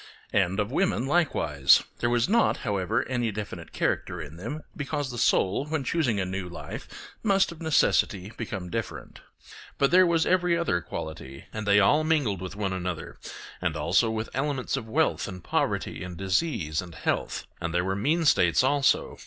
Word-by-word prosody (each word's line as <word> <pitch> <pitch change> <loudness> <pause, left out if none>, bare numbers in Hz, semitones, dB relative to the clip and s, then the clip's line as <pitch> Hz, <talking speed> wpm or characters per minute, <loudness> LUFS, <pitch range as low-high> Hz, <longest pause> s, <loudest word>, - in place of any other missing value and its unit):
And 95 +1 +2
of 105 +2 -1
women 145 -6 +1
likewise; 80 - +3 0.2
there 120 - +1
was 120 -1 +2
not, 230 +4 +3
however, 100 -5 0
any 120 -3 -1
definite 100 -5 -7
character 90 - -1
in 75 -1 -8
them, 130 - -6
because 145 -2 -3
the 120 - -5
soul, 100 +7 +2
when 155 -2 -1
choosing 130 -7 0
a 95 - 0
new 95 -1 -4
life, 85 - -7 0.3
must 195 -4 +3
of 170 0 -11
necessity 105 - +2
become 95 -6 -5
different. 115 -1 -5 0.6
But 140 - +2
there 185 0 +6
was 165 -1 +2
every 180 -2 +2
other 130 - 0
quality, 80 -5 -7
and 110 -1 -5
the 100 0 +6
all 145 +10 +4
mingled 145 - +1
with 95 +2 -6
one 100 -2 -2
another, 90 -3 -5 0.4
and 85 -4 -1
also 90 +9 +2
with 110 0 -3
elements 135 0 -1
of 125 -5 -5
wealth 155 +2 +1
and 90 -4 -8
poverty, - - -1
and 90 -1 -7
disease 95 - 0
and 85 -3 -11
health; - - -2 0.2
and 85 - -2
there 90 +1 0
were 95 0 -1
mean 155 +11 +1
states 140 - +4
also. 140 +1 +2
110 Hz, 180 wpm, -27 LUFS, 90-145 Hz, 0.6 s, there